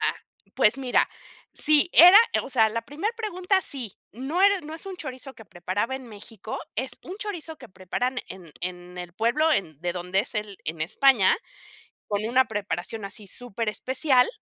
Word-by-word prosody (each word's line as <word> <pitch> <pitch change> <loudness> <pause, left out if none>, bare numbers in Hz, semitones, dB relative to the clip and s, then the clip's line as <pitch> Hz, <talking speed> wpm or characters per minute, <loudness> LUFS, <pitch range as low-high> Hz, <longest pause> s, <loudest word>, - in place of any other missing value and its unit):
Ah, - - +1 0.4
pues 215 +5 +3
mira, 255 -2 +2 0.4
sí 305 +3 +4
era 360 +5 +10 0.2
o - - -8
sea, 225 -4 +4
la 230 +2 -3
primer 305 - -3
pregunta 385 -3 0
sí, 255 - -4 0.2
no 275 - -2
era 400 -1 +5
no 310 0 -8
es 330 - -7
un 385 -1 -6
chorizo 265 -3 -8
que 225 - -13
preparaba 185 +7 -3
en 260 -2 -11
México, 215 0 -8 0.2
es 260 +2 -2
un 370 - -8
chorizo 345 -7 -5
que 250 - -12
preparan 245 +8 -3
en 180 -4 -10
en 180 0 -5
el 175 -1 -7
pueblo 240 - +2
en 155 - -2
de 175 0 -1
donde 180 +2 0
es 240 - -6
él 210 -2 -4
en 160 +1 -3
España, 215 +5 +4 0.7
con 205 0 -1
una 255 +3 +3
preparación 205 0 -4
así 200 +1 -7
súper 230 +1 -5
especial, 260 +3 +2
235 Hz, 180 wpm, -25 LUFS, 195-295 Hz, 0.7 s, era